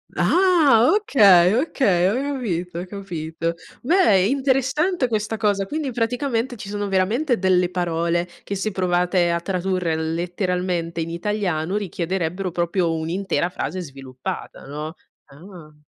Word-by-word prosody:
Ah! 320 -11 +4
Okay, 200 - +5
okay, 205 - +2
ho - - 0 0.2
capito, 180 -9 -3
ho 180 - -5
capito. 170 -4 -4 0.3
Beh, 255 - +4
interessante 270 +4 +1
questa 220 -1 -2
cosa, 205 -3 +1
quindi 300 -3 -3
praticamente 245 +1 -1
ci 205 -2 -8
sono 205 0 -3
veramente 225 +8 +1
delle 180 -1 +2
parole 170 -1 -1 0.2
che 200 - -4
se 210 +2 -2
provate 180 -1 +1
a 170 - 0
tradurre 180 -2 -1
letteralmente 170 +1 -2
in 165 - -3
italiano 180 -2 -2
richiederebbero 185 -2 -2
proprio 175 0 0
un'intera 175 +2 -1
frase 185 0 -4
sviluppata, 135 -5 -7
no? 150 +4 -6 0.3
Ah! 155 0 -14
185 Hz, 125 wpm, -22 LUFS, 170-225 Hz, 0.3 s, Okay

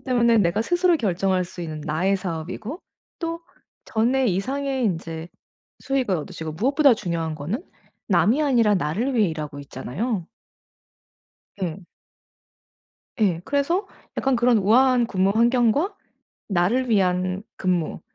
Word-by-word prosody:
때문에 235 -3 +3
내가 190 +2 +2
스스로 350 +5 +3
결정할 190 - 0
수 180 0 -10
있는 155 -2 -5
나의 180 +6 +1
사업이고 185 - -5 0.4
또 335 -1 -3 0.5
전에 250 +4 +1
이상의 265 +6 -1
인제 165 -3 -3 0.5
수익을 260 -8 0
얻으시고 160 -1 -6
무엇보다 270 - +4
중요한 170 -6 -3
거는 175 - -4 0.5
남이 255 +9 +3
아니라 235 -8 +3
나를 195 - -1
위해 215 -5 +3
일하고 150 -2 -6
있잖아요. 165 - -4 1.4
예. 175 +1 -3 1.4
예 180 -6 +2
그래서 285 - 0 0.3
약간 270 -1 +2
그런 240 0 +4
'우아한 245 +4 +4
근무 195 -3 +1
환경과 245 - +3 0.5
나를 205 +8 +1
위한 185 -2 +1
근무 180 -3 -1
210 Hz, 275 characters per minute, -23 LUFS, 175-255 Hz, 1.4 s, 무엇보다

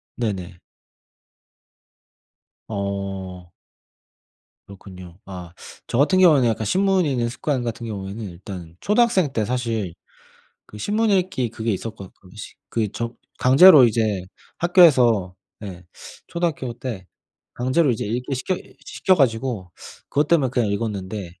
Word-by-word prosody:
네네. 95 -6 -4 2.1
어. 95 -3 -5 1.1
그렇군요. 95 -2 -12
아 90 -2 -9 0.3
저 - - -2
같은 155 +8 +3
경우에는 150 -9 +6
약간 110 -1 -1
신문 190 - +2
읽는 125 -5 0
습관 130 +1 -2
같은 115 0 -4
경우에는 100 0 -6
일단 85 -2 -10
초등학생 210 - +2
때 110 - 0
사실 115 -7 -2 0.7
그 105 - -12
신문 215 - 0
읽기 185 - 0
그게 115 0 -3
있었거 100 -1 -6
거시 100 +3 -12 0.2
그 110 -2 0
저 115 0 -4 0.2
강제로 135 +1 +8
이제 110 -4 0 0.3
학교에서 125 - +4 0.3
예 90 -3 -8 0.4
초등학교 160 -8 -2
때 115 -6 -6 0.5
강제로 130 +4 +1
이제 110 - -3
읽게 125 +6 -3
시켜 135 +8 -1 0.3
시켜 190 - +1
가지고 115 - 0 0.4
그것 145 +1 +1
때문에 150 -6 +3
그냥 120 -4 0
읽었는데 100 -2 -3
115 Hz, 260 characters per minute, -22 LUFS, 100-140 Hz, 2.1 s, 강제로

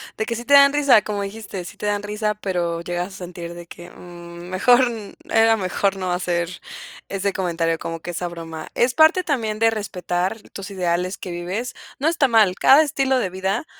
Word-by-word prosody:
de 220 - -2
que 235 - -2
sí 240 +1 -6
te 285 - +2
dan 280 0 +8
risa, 285 -7 +5
como 205 -1 -3
dijiste: 200 -3 -7
"Sí - - -10
te 210 - -4
dan 205 0 -1
risa", 210 +1 -2
pero 175 -5 -2
llegas 175 +1 -3
a - - -9
sentir 175 -2 -8
de 175 0 -9
que, 175 +1 -12
mm, 175 0 -11
mejor 245 +7 +5 0.4
era 225 0 +4
mejor 195 0 0
no 185 -1 -2
hacer 175 -1 -1 0.6
ese 195 0 -1
comentario, 165 -3 -1
como 165 0 -5
que 175 - -6
esa 175 +1 -3
broma. 165 -2 -8
Es 245 +1 +2
parte 315 +6 +5
también 230 -10 -1
de 225 +1 +3
respetar 185 -2 -2
tus 195 0 -7
ideales 180 -1 -1
que 180 - -7
vives, 185 +8 -4 0.2
no 290 - -1
está 320 -4 +3
mal, 220 -6 +4
cada 285 +4 +7
estilo 270 -3 +1
de 195 -8 -1
vida 190 - -2
195 Hz, 200 wpm, -22 LUFS, 175-225 Hz, 0.6 s, dan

